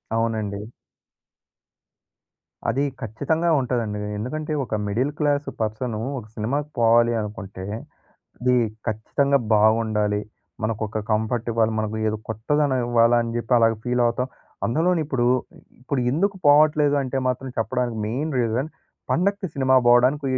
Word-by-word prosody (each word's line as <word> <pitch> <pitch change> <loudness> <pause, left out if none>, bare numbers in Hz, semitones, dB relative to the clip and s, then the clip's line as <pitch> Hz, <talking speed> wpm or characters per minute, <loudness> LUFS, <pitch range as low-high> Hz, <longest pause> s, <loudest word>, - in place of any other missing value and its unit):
అవునండి. 110 -3 -2 2.0
అది 135 +5 +1 0.2
ఖచ్చితంగా 145 +10 -1
ఉంటదండి. 115 -5 -2 0.2
ఎందుకంటే 155 +8 -3
ఒక 110 - -3
మిడిల్ 125 +8 0
క్లాస్ 145 -1 +1
పర్సను 110 +1 -2 0.2
ఒక 110 - -11
సినిమాకి 140 +7 -2
పోవాలి 115 +1 +4
అనుకుంటే, 100 -3 -7 0.8
అది 125 0 +3 0.3
ఖచ్చితంగా 140 +6 +1 0.2
బాగుండాలి. 105 -1 +2 0.4
మనకొక 110 0 -2
కంఫర్ట్ 110 +2 0
ఇవ్వాలి. 115 0 +2
మనకు 110 0 -2
ఏదో 110 - -1
కొత్తదనం 130 +5 0
ఇవ్వాలని 120 0 +3
జెప్పి 120 +1 -3
అలాగా 115 -1 +3
ఫీల్ 125 0 +1
అవుతాం. 125 +2 -1 0.4
అందులోని 165 +8 +2
ఇప్పుడు, 130 -5 0 0.5
ఇప్పుడు 130 +1 -2
ఎందుకు 195 +6 +1
పోవట్లేదు 150 0 +5
అంటే 135 0 -3
మాత్రం 130 +1 -3
చెప్పడానికి 120 0 -1
మెయిన్ 140 +8 -2
రీజన్ 120 +5 0 0.4
పండకి 200 +2 +1
సినిమా 130 -1 +2
బోవడానికి 125 +4 +4
120 Hz, 120 wpm, -23 LUFS, 110-140 Hz, 2.0 s, పోవట్లేదు